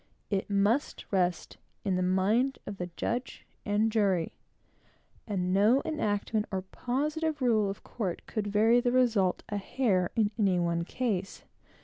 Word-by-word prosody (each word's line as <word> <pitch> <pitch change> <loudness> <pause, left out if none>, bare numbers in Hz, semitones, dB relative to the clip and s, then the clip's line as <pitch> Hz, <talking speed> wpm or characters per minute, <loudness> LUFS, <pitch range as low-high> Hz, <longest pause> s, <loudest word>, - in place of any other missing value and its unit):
It 195 0 -1
must 205 +7 +1
rest 180 -3 0 0.3
in 190 -2 +1
the 185 - 0
mind 200 +9 +2
of 205 - -6
the 180 -1 -4
judge 250 +2 -3 0.2
and 210 +2 +2
jury; 195 -6 +1 0.9
and 185 -3 -1
no 215 +8 +4
enactment 215 -7 -1
or 190 -1 -2
positive 300 - -2
rule 220 -6 +2
of 195 - -6
court 195 -7 -4
could 210 -2 -3
vary 220 +4 +4
the 245 0 +1
result 230 -7 +2
a 205 - -2
hair, 195 -4 +1
in 215 -3 +2
any 190 -4 +3
one 170 -1 0
case. 200 -4 -3
205 Hz, 145 wpm, -29 LUFS, 190-240 Hz, 0.9 s, no